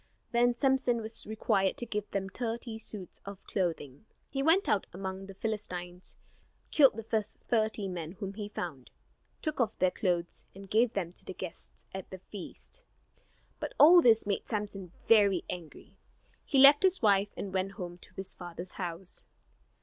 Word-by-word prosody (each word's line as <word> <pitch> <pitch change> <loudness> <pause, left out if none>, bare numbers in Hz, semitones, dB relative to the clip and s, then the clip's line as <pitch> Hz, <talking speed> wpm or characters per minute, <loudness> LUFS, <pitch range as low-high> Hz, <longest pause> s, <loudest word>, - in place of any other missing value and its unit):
Then 240 0 +3
Samson 265 -2 +2
was 220 0 -1
required 210 -3 +1
to 240 - -3
give 210 -2 -3
them 195 -1 -2
thirty 230 +2 -4
suits 205 -5 -4
of 200 -1 -9
clothing. 165 -4 -3 0.3
He 270 - -1
went 325 +7 +4
out 205 - +1
among 190 +1 -5
the 195 - -10
Philistines, 180 -4 -5 0.5
killed 275 -7 +6
the 225 - -5
first 215 -1 -2
thirty 220 -3 +1
men 170 -3 -5
whom 195 -1 -6
he 205 0 -6
found, 155 -11 -6 0.5
took 310 -4 -1
off 220 -2 0
their 185 0 +3
clothes, 175 -3 -2
and 195 0 -10
gave 230 +2 +3
them 175 -3 -2
to - - -16
the - - -7
guests - - -9
at 190 -1 -6
the 190 - -7
feast. 205 - -10 0.8
But - - -4
all 345 +4 +9
this 225 -5 +5
made 200 -1 -2
Samson 205 -5 -4 0.2
very 200 -5 +5
angry. 170 -4 -9 0.5
He 280 - 0
left 280 +2 +9
his 375 -6 +3
wife 200 -1 +4
and 195 -2 -5
went 190 +1 -1
home 175 -3 -7
to - - -17
his 190 0 -5
father's 175 0 -8
house. 175 0 -5
200 Hz, 170 wpm, -31 LUFS, 185-225 Hz, 0.8 s, all